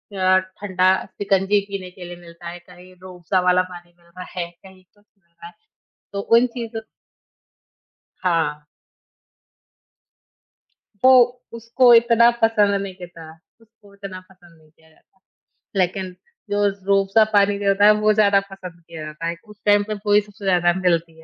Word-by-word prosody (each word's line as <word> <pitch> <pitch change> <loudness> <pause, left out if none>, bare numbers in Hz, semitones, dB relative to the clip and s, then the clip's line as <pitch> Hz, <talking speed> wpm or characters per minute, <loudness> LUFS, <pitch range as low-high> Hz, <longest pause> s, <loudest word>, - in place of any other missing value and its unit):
अ, 185 0 +3
ठंडा 185 0 -1 0.2
शिकंजी 195 0 0
पीने 190 -2 -6
के 180 -2 -11
लिए 175 0 -9
मिलता 170 0 -13
है, 175 - -8
कहीं 180 +1 -17
रूह 185 -1 -12
अफ़ज़ा 185 +2 0
वाला 180 0 +3
पानी 175 0 -13
मिल 170 - -28
रहा 180 +1 -11 0.2
है, 170 0 -3
कहीं 185 +1 -19
कुछ 205 +3 -33 0.2
मिल 170 -2 -43
रहा 170 0 -13
है। 175 - -15 0.6
तो 200 - -3
उन 230 +4 +3
चीज़ों 230 -1 -5 1.4
हाँ। 160 -4 -1 2.4
वो 260 - +7 0.5
उसको 240 +2 +3
इतना 235 0 +5
पसंद 210 -3 +3
नहीं 190 -2 -7
करता 175 -3 -12 0.3
उसको 220 -2 -23
उतना 195 -2 -9
नहीं 170 -4 -23
किया 160 0 -27
जाता। 190 - -32 0.6
लेकिन 185 0 -1 0.4
जो 205 0 0 0.2
रूह 195 0 +3
अफ़ज़ा 215 +3 +4
पानी 200 0 +3
दिया 200 -1 0
होता 200 +1 +3
है 210 - +8
वो 215 0 +3
ज़्यादा 205 -2 +3
पसंद 180 -3 -11
किया 160 -2 -9
जाता 155 +2 -7
है, 170 - -3
उस 210 -1 -17
टाइम 205 0 +4
पे 215 - -3
वो 205 - +2
ही 210 - +5
सबसे 205 0 -14
ज़्यादा 175 -2 +2
मिलती 165 -2 -1
है। - - -16
185 Hz, 165 wpm, -21 LUFS, 175-205 Hz, 2.4 s, है